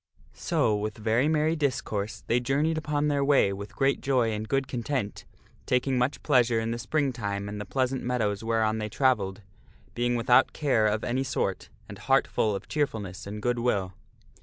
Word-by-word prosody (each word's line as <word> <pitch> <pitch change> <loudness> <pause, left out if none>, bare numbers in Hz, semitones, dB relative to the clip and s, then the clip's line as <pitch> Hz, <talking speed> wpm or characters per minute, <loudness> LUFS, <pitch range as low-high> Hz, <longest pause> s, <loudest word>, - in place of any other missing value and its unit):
So, 105 - +1
with 105 +1 -3
very 115 +5 +1
merry 155 +1 +2
discourse 125 -8 -2
they 120 - +2
journeyed 140 +6 +1
upon 150 -1 -1
their 140 -1 +1
way 140 -8 +3
with 100 +1 -8
great 135 0 +1
joy 125 -4 +2
and 110 0 -4
good 135 -1 +1
content, 125 -4 -3 0.4
taking 130 +1 +1
much 125 +3 -1
pleasure 120 -2 +3
in 115 0 -2
the 115 - -3
spring 140 +2 0
time 100 -4 -3
and 105 0 -5
the 105 - -7
pleasant 130 +1 -1
meadows 115 -4 -1
whereon 110 -1 +1
they 105 0 -3
travelled, 105 -6 +1 0.5
being 120 0 0
without 120 +2 +4
care 125 -8 +2
of 105 +1 0
any 130 +2 0
sort, 135 - -2 0.2
and - - -10
heart - - +3
full 105 -2 0
of 95 - -7
cheerfulness 105 -11 -3
and 105 +1 -6
good 120 0 +1
will. 100 -6 0
120 Hz, 185 wpm, -27 LUFS, 105-135 Hz, 0.5 s, without